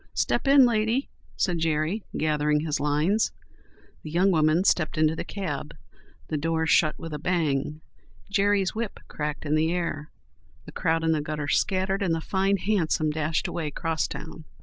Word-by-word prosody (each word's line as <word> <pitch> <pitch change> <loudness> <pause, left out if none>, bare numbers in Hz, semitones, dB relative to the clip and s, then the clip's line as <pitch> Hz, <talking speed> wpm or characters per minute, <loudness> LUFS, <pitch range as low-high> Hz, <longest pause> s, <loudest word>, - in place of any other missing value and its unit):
"Step - - 0
in, 275 -1 +7
lady," 230 +3 +1 0.3
said 175 -2 0
Jerry, 160 +5 0
gathering 150 -1 +1
his 150 -2 -1
lines. 150 +9 +1 0.7
The 155 - -8
young 180 +5 +3
woman 155 +1 +3
stepped 165 -6 +1
into 155 0 +3
the - - -4
cab; 150 -7 -5 0.5
the 155 - -2
doors 160 +1 0
shut 155 -2 +3
with 165 -1 -7
a 150 - -4
bang; 155 -3 -1 0.5
Jerry's 200 -1 +2
whip 225 -1 -4
cracked 150 0 -4
in 145 - 0
the 155 +1 +2
air; 165 -3 -3 0.6
the - - -10
crowd 165 -2 0
in 160 - +2
the 155 -2 +1
gutter 150 -1 -4
scattered, 190 +5 +1
and 175 -4 +1
the - - -2
fine 195 +4 +1
hansom 170 -6 +1
dashed 155 +3 -1
away 170 -3 -3
'crosstown. 160 +1 -4
160 Hz, 165 wpm, -26 LUFS, 155-190 Hz, 0.7 s, in